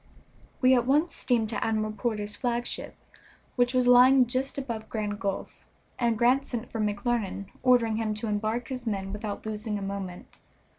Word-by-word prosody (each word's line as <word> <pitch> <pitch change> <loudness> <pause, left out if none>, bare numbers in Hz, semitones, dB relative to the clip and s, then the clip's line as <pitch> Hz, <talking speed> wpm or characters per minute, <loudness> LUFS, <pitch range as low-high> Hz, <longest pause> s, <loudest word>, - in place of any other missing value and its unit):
We 255 0 +6
at 245 -1 +2
once 300 +5 +3
steamed 230 -3 0
to - - -2
Admiral 215 -1 0
Porter's 210 -1 -2
flagship, 240 -1 -3 0.6
which 245 0 +2
was 255 -1 +3
lying 250 +1 +7
just 255 +4 -2
above 230 -5 -5
Grand 210 -2 -3
Gulf, 195 -1 -4 0.4
and 235 -2 +2
Grant 250 +4 +3
sent 240 -1 -4
for 225 - -2
McClernand, 205 -1 -1
ordering 240 -4 +3
him 220 -1 -1
to 215 - -4
embark 215 +3 -1
his 250 -2 -5
men 195 -2 -2
without 210 0 -5
losing 215 0 -3
a - - -5
moment. 195 -2 -6
225 Hz, 165 wpm, -27 LUFS, 210-245 Hz, 0.6 s, lying